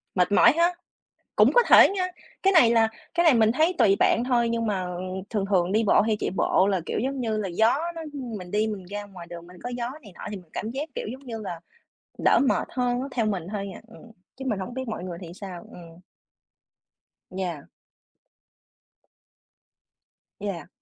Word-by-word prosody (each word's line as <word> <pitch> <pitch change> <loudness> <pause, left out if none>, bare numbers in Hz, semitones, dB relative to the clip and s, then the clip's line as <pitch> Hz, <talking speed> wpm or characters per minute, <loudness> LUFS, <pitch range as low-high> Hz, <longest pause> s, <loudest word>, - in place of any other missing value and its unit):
Mệt 180 0 +2
mỏi 205 - +7
ha. 340 +2 +3 0.6
Cũng - - +5
có - - +6
thể - - +8
nha, 380 -2 -1 0.4
cái 390 - +4
này 285 -11 +6
là 225 -1 +4 0.3
cái 345 0 +2
này 320 - +6
mình 220 -1 +4
thấy 320 +8 +2
tùy 205 -5 +5
bạn 235 - +3
thôi, 240 -2 +2
nhưng 230 0 -1
mà, 200 -3 -1
ờ, 180 -1 -5
ừm, 185 +1 -5
thường 210 -4 -1
thường 180 -1 +2
đi 220 +2 +2
bộ 205 - +5
hay 215 0 +1
chạy - - -1
bộ 190 0 +2
là, 195 -2 +1
kiểu, - - -2
giống 265 +3 -2
như 225 -3 -1
là, 200 -3 -2
gió 220 +8 +3 0.2
nó 330 - -6
mình 225 -10 -7
đi 210 +2 +1
mình 205 -4 -5
ra 205 +2 -5
ngoài 185 -4 -11
đường 170 -1 -9
mình 180 +1 -14
có - - -4
gió 245 0 -3
này 205 -6 -13
nọ - - -14
thì 205 - -5
mình 175 -4 -13
cảm 220 - -4
giác, 280 +6 -4
kiểu, - - -4
giống 270 +2 -11
như 230 -2 -5
là, 175 -5 -6 0.6
đỡ - - +5
mệt - - 0
hơn 245 -1 0
á, 265 - -3
theo 230 -4 0
mình 190 -6 -2
thôi 200 -2 -4
à. - - -10
Ừm, 230 +1 -15 0.3
chứ 265 - -7
mình 215 - 0
không 195 +6 -6
biết 260 -1 -4
mọi 215 -5 -4
người 175 -2 -6
thì 170 -3 -9
sao. 185 -3 -8
Ừm. 170 -1 -13 1.3
Yeah. 180 -6 -4 2.7
Yeah. 195 -7 -5
215 Hz, 215 wpm, -25 LUFS, 185-245 Hz, 2.7 s, thể